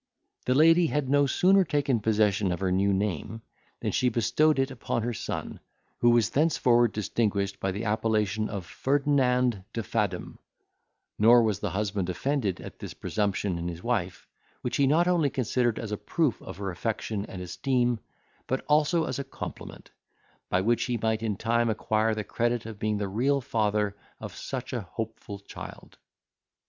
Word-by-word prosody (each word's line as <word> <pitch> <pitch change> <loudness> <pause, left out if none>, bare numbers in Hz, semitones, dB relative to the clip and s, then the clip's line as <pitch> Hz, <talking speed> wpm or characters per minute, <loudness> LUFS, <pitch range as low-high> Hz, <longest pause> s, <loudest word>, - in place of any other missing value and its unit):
The 125 - +3
lady 165 +3 +6
had 150 -3 -1
no 145 0 +4
sooner 190 +7 +4
taken 145 -6 +1
possession 105 -3 +2
of 90 - -2
her 95 -1 0
new 100 +2 +2
name, 100 +2 -2 0.4
than - - -1
she 125 - +2
bestowed 125 +7 +2
it 135 0 +1
upon 120 -2 -2
her 120 +1 -1
son, - - -5 0.4
who 120 - +5
was 120 -2 +3
thenceforward 125 -6 +3
distinguished 100 -2 -1
by 95 - -1
the 105 +5 -4
appellation 110 -1 0
of 100 -4 -5
Ferdinand 125 -4 +1
de 115 - -2
Fadom; 100 -5 -2 0.8
nor 115 +3 +7
was 105 -3 0
the - - -2
husband 100 -2 -2
offended 100 +1 -1
at - - -10
this - - -7
presumption 100 -3 -1
in 85 - -3
his 85 0 -6
wife, 100 -7 -2 0.4
which - - -1
he 140 - +4
not 165 +5 +3
only 170 -5 +3
considered 120 -2 0
as 110 -2 -5
a 105 - -1
proof 155 0 0
of - - -9
her 100 -1 -3
affection 105 +2 -3
and 95 - -8
esteem, 120 +5 0 0.5
but 130 - -2
also 150 +3 +3
as - - -3
a - - -2
compliment, - - -9 0.6
by 90 - +2
which 115 +4 +1
he 125 -2 -1
might 110 0 0
in 110 -3 -1
time 115 +1 +1
acquire 110 0 +1
the 105 - -3
credit 120 +2 -1
of 110 -2 -8
being 105 -1 0
the 100 -1 -2
real 130 +8 +1
father 105 -5 0 0.2
of - - -7
such 130 -1 -5
a 120 - -1
hopeful 110 0 -6
child. 100 - -11
115 Hz, 175 wpm, -27 LUFS, 105-130 Hz, 0.8 s, nor